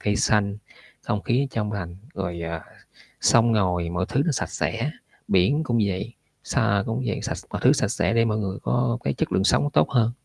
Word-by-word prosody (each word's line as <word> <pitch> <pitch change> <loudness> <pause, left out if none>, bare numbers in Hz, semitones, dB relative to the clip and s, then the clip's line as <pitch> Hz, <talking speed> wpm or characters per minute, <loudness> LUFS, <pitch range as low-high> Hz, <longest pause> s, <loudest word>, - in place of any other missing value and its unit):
cây 105 0 0
xanh, 100 -2 +2 0.5
không 105 - -2
khí 135 +3 +1
trong 105 -3 -2
lành, 90 -4 -5 0.2
rồi, 90 -3 -4
à, 85 0 -4 0.6
sông 115 0 +4
ngòi 90 -5 +1
mọi 90 +1 -1
thứ 135 - +1
nó 160 - +2
sạch - - -2
sẽ, 115 +6 -1 0.4
biển 95 - +3
cũng 120 -4 +1
vậy, 100 +5 -3 0.3
xa 100 0 +1
cũng 115 +3 -2
vậy, 105 - -2
sạch - - -3
mọi - - -4
thứ - - +7
sạch - - +1
sẽ - - 0
để 115 0 +4
mọi 110 -1 0
người 100 -2 -3
có 120 -1 +1
cái 70 - 0
chất - - -2
lượng 95 +1 +2
sống 145 +7 +3
tốt - - +3
hơn. 115 -3 +3
105 Hz, 210 wpm, -24 LUFS, 95-115 Hz, 0.6 s, thứ